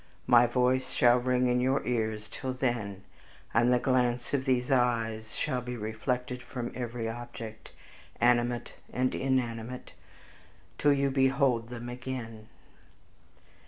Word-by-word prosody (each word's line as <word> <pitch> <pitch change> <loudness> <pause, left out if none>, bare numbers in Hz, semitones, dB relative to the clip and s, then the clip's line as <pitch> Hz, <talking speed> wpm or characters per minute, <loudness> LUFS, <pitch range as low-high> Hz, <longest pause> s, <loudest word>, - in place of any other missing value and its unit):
My 120 0 +6
voice 130 +1 +1
shall 120 0 +5
ring 125 0 +2
in 125 0 +2
your 130 +2 +1
ears 110 -3 -1
till 130 -1 -4
then, 115 -7 -2 0.5
and 120 +2 +4
the 125 - +5
glance 125 -1 +1
of 135 -2 +1
these 125 0 +1
eyes 115 -4 +1
shall 125 -1 -1
be 125 0 -5
reflected 125 +3 -3
from 120 0 -5
every 120 -2 -4
object, 115 -1 -7 0.5
animate 120 0 +2 0.2
or - - -6
inanimate, 125 -2 -1 0.9
till 145 -1 +5
you 140 -1 +1
behold 135 -3 +2
them 120 -1 -7
again." 120 -3 -6
125 Hz, 125 wpm, -29 LUFS, 115-130 Hz, 0.9 s, My